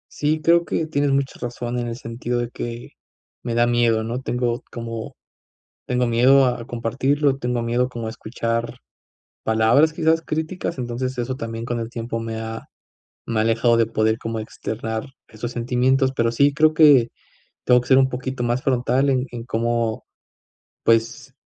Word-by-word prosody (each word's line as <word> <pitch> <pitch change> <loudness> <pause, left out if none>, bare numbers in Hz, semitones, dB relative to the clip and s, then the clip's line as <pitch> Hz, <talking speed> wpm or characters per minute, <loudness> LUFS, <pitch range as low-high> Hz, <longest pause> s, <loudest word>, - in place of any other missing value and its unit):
Sí, 155 +1 0
creo 170 +2 +4
que 160 - -1
tienes 145 -2 0
mucha 135 0 -1
razón 120 0 -4
en 120 - -2
el 115 -1 -4
sentido 120 +1 -4
de 120 - -2
que 120 0 -7 0.5
me 120 -1 -3
da 120 0 +3
miedo, 120 -2 +2
¿no? 120 +3 -4
Tengo 125 -2 -1
como 115 -1 -6 0.7
tengo 125 0 0
miedo 130 +4 +5
a 120 -2 -2
compartirlo, 135 +4 0
tengo 125 -2 -2
miedo 120 +2 0
como 115 -2 -5
a - - -3
escuchar 115 +1 -3 0.7
palabras, 110 +8 +4
quizás, 160 +1 +2
críticas. 160 +2 -3
Entonces 125 +1 -3
eso 125 +1 -2
también 115 -1 -5
con 120 -1 -2
el 115 - -5
tiempo 115 -1 -4
me 115 0 -4
ha 110 0 -5 0.7
alejado 115 +1 +2
de 115 - +4
poder 110 0 +1
como 115 -1 -4
externar 110 +1 -5 0.2
esos 115 +2 -6
sentimientos, 130 +3 +1
pero 115 0 +1
sí 140 +4 +3
creo 155 +1 +4
que 145 -7 +6 0.6
tengo 125 -1 +5
que 125 - -10
ser 130 - +6
un 130 0 +3
poquito 130 0 -4
más 120 +1 0
frontal 130 +1 +1
en 130 -1 +1
en 120 -1 -7
cómo, 115 -1 -1 0.8
pues, 115 0 +1
120 Hz, 165 wpm, -22 LUFS, 115-130 Hz, 0.8 s, que